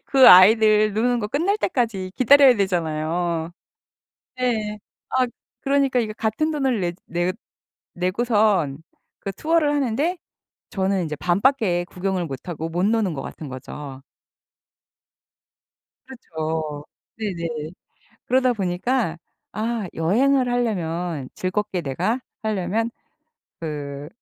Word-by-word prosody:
그 270 -2 +7
아이들 215 +3 +7
노는 240 +3 +1
거 210 - -2
끝날 340 - 0
때까지 225 - -1
기다려야 270 +1 +7
되잖아요. 170 -2 -1 0.9
네. 220 -4 -1 0.3
아 260 -1 +2 0.4
그러니까 275 -2 +2
이게 220 -3 -1
같은 225 +8 -1
돈을 265 -8 0
내 175 -1 -1
내 175 +1 -1 0.6
내고선 185 - +1 0.4
그 195 - -5
투어를 310 - +1
하는데 290 +5 0 0.5
저는 190 -1 0
인제 150 -2 -4
반밖에 180 - +1
구경을 185 0 -2
못하고 160 +3 -5
못 175 +3 -1
노는 215 -3 +1
것 135 - -5
같은 155 - -8
거죠. 135 +1 -8 2.0
그렇죠. 160 - -5 0.3
네네. 170 -7 -4 0.6
그러다 255 0 +3
보니까 190 -1 -1 0.3
'아 220 0 -2
여행을 250 +10 +2
하려면 175 - -2
즐겁게 185 0 -2
내가 175 - -1 0.2
하려면 215 +2 -1 0.7
그 145 -2 -5
200 Hz, 230 characters per minute, -23 LUFS, 170-245 Hz, 2.0 s, 그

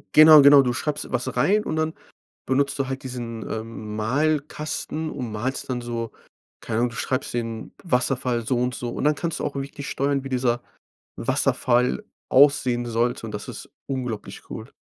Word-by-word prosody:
Genau, 155 -1 +10
genau. 140 0 +9
Du 125 -1 0
schreibst 150 +4 -3
was 125 -1 -2
rein 205 +11 +3
und 155 - -3
dann 160 0 0 0.5
benutzt 140 +2 +1
du 135 -1 -1
halt 135 0 -4
diesen, 120 -3 -5
ähm, 110 -1 -5
Malkasten 150 +5 -1
und 125 -6 -5
malst 130 +5 -3
dann 125 -1 -1
so 115 -1 -4 0.5
keine 110 -1 -2
Ahnung, 120 0 +1
du 115 - -10
schreibst 130 +1 -2
den 115 -2 -4
Wasserfall 125 -5 0
so 125 -2 +1
und 125 0 0
so. 120 -1 -4
Und - - -4
dann 150 0 +4
kannst 165 +1 -3
du - - -2
auch - - -3
wirklich 140 +1 -6
nicht 140 - -5
steuern, 140 0 0
wie - - -5
dieser 125 -2 +1 0.6
Wasserfall 125 - +1 0.3
aussehen 130 -3 +4
sollte 120 +1 0
und - - -6
das - - -6
ist - - -8 0.2
unglaublich 125 -5 -5
cool. - - -8
130 Hz, 180 wpm, -24 LUFS, 120-140 Hz, 0.6 s, Genau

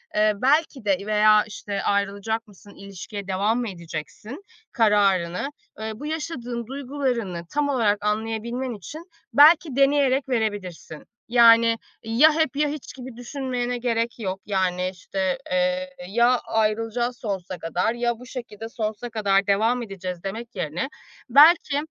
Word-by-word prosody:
eee, 215 0 +3
belki 275 -3 +2
de 195 -2 +3
veya 215 0 +5
işte 200 -1 -5
ayrılacak 200 +3 -1
mısın, 205 0 -17
ilişkiye 200 +1 -8
devam 205 +5 +1
mı 235 - -2
edeceksin 185 - -8 0.3
kararını, 200 -1 +2 0.3
eee, 220 0 -4
bu 285 - -9
yaşadığın 255 -7 -4
duygularını 255 -9 -3
tam 290 -1 0
olarak 210 -6 +1
anlayabilmen 225 +4 -2
için 300 - -9 0.3
belki 300 -1 +6
deneyerek 275 -1 +3
verebilirsin. 205 -9 -3 0.2
Yani 230 -1 +6 0.3
ya 245 +8 +5
hep 315 -4 0
ya 295 +1 +2
hiç 295 -3 -7
gibi 255 -2 -9
düşünmene 250 -1 -3
gerek 235 -1 -1
yok, 190 -3 -3
yani, 185 -2 0
işte, 190 +6 -2
eee, 275 0 0 0.2
"Ya 240 +3 +3
ayrılacağız 225 +2 -1
sonsuza 190 -4 -4
kadar 180 +7 -1
ya 240 -1 -1
bu 250 - -11
şekilde 225 -4 -8
sonsuza 225 0 -4
kadar 200 -3 +1
devam 225 +5 +2
edeceğiz." 185 -4 -6
demek 225 +5 -6
yerine 160 - -3 0.4
belki, 295 +3 +6
225 Hz, 135 wpm, -24 LUFS, 200-255 Hz, 0.4 s, belki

